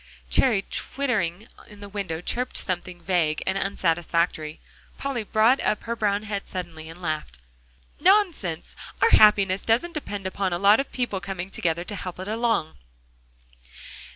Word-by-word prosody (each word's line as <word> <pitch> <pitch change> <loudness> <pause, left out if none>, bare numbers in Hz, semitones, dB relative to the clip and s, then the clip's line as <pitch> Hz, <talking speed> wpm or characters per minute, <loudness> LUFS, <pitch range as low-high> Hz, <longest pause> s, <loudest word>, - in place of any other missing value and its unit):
Cherry, 215 -7 +3
twittering 220 -8 -2 0.2
in 210 -1 -14
the 205 - -8
window, 195 -5 -4
chirped 250 +7 -1
something 180 -1 -3
vague 165 -4 +1
and 190 - 0
unsatisfactory. 170 -4 0 0.4
Polly 275 -4 -2
brought 220 +5 +3
up 210 - 0
her 235 0 -3
brown 210 -2 0
head 205 -2 -4
suddenly 165 -4 -6
and 175 +2 -11
laughed. 155 - -3 0.6
"Nonsense! 350 - +2 0.2
our - - +4
happiness 200 -3 +6
doesn't 250 +10 +1
depend 205 - -5
upon 190 -1 -1
a - - 0
lot 200 +5 +6
of 275 - -3
people 240 -6 -2
coming 185 0 -5
together 170 -1 -1
to 205 +3 -5
help 180 -2 -6
it 185 - -5
along. 225 -7 0
195 Hz, 150 wpm, -25 LUFS, 175-220 Hz, 0.6 s, happiness